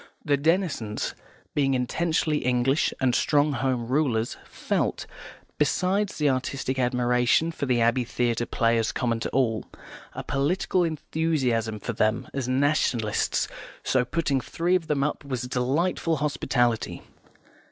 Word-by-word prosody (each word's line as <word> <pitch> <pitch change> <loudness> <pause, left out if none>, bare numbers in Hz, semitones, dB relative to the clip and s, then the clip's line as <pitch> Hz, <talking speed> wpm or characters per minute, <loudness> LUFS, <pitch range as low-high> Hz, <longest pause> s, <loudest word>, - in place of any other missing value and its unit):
The 145 -2 +3
Denisons, 150 - 0 0.4
being 135 -2 +2
intensely 155 +4 0
English 125 +3 +1
and 130 -2 +2
strong 145 +3 +3
Home 130 -3 -1
Rulers, 125 -4 +1
felt, - - -2 0.5
besides 185 +7 +1
the 150 - +2
artistic 130 0 -1
admiration 125 +5 +2
for 150 -4 -4
the 125 -2 +2
Abbey 120 +2 +3
Theatre 120 -1 -1
players 115 -1 +1
common 115 -2 -1
to - - -3
all, 115 -4 0 0.5
a - - -5
political 175 +6 +1
enthusiasm 140 -9 -1
for 115 - -4
them 110 +1 0
as 135 -3 -2
Nationalists, 130 -5 +1 0.4
so 130 -1 +2
putting 140 +1 0
three 170 +7 -1
of 170 -3 -1
them 140 -2 +1
up 150 - -2
was 130 -3 -3
a - - -4
delightful 150 +7 0
hospitality. 135 -5 0
130 Hz, 130 wpm, -26 LUFS, 120-150 Hz, 0.5 s, The